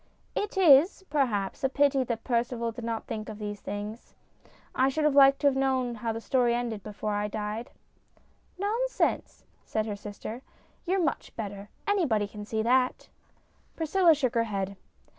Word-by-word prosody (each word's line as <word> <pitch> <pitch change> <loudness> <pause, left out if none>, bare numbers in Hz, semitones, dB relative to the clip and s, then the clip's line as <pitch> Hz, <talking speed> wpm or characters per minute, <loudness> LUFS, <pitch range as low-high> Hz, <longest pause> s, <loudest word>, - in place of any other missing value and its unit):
" - - -38
It 415 -1 -6
is, 340 +1 +6
perhaps, 235 -10 0
a 265 - +3
pity 280 -1 +3
that 230 -2 -3
Percival 235 -1 -1
did 230 +1 -8
not 230 -1 -3
think 215 -1 -5
of 215 - -7
these 205 -1 -5
things. 210 +3 -6 0.6
I 260 +1 +3
should 305 +3 -1
have 300 -1 +3
liked 275 0 +6
to 290 - +4
have 275 - +3
known 260 -2 +1
how 230 0 -3
the 225 - -4
story 240 0 +2
ended 235 -3 -3
before 210 +1 -4
I 205 0 0
died." 210 +3 -4 0.5
" - - -36
Nonsense! 455 +6 -1
" - - -38
said 215 -1 -2
her 210 -2 -3
sister. 210 +3 -7 0.2
" - - -35
You're 375 0 +2
much 290 - -2
better. 205 -2 -6 0.2
Anybody 290 - +2
can 210 0 -9
see 220 +1 -1
that." 250 +2 +1 0.7
Priscilla 330 +1 +4
shook 260 -5 0
her 230 -1 +2
head. 200 -2 -3
235 Hz, 180 wpm, -28 LUFS, 215-275 Hz, 0.7 s, is